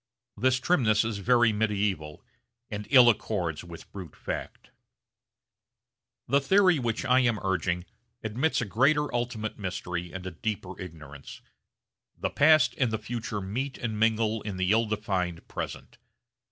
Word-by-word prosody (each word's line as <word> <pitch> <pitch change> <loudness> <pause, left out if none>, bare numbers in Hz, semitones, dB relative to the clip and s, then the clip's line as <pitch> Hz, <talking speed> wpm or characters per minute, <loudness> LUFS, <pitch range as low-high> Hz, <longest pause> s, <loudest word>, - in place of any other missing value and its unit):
This 130 +4 +2
trimness 115 -9 +2
is 110 -3 -3
very 120 +1 +4
medieval 100 -8 -1 0.5
and 105 0 -5
ill 125 -3 +8
accords 95 -8 0
with 85 -1 -11
brute 95 -5 -9
fact. - - -6 1.6
The 140 +3 +3
theory 185 +2 +4
which 120 0 -2
I 130 0 +4
am 120 -4 +2
urging 90 -2 -1 0.4
admits 125 +9 0
a - - -1
greater 145 +8 +2
ultimate 120 -3 -3
mystery 90 -2 -4
and 95 -1 -7
a 95 - -4
deeper 95 +1 -5
ignorance. 75 -6 -10 0.8
The - - -2
past 155 +1 +5
and 130 -4 +3
the 110 - -1
future 110 -1 -4
meet 125 +8 -3
and 110 -3 -3
mingle 110 0 +2
in 100 -3 -5
the 95 +1 +1
ill 115 +1 +3
defined 95 -5 -2
present. - - -7
110 Hz, 140 wpm, -28 LUFS, 95-120 Hz, 1.6 s, ill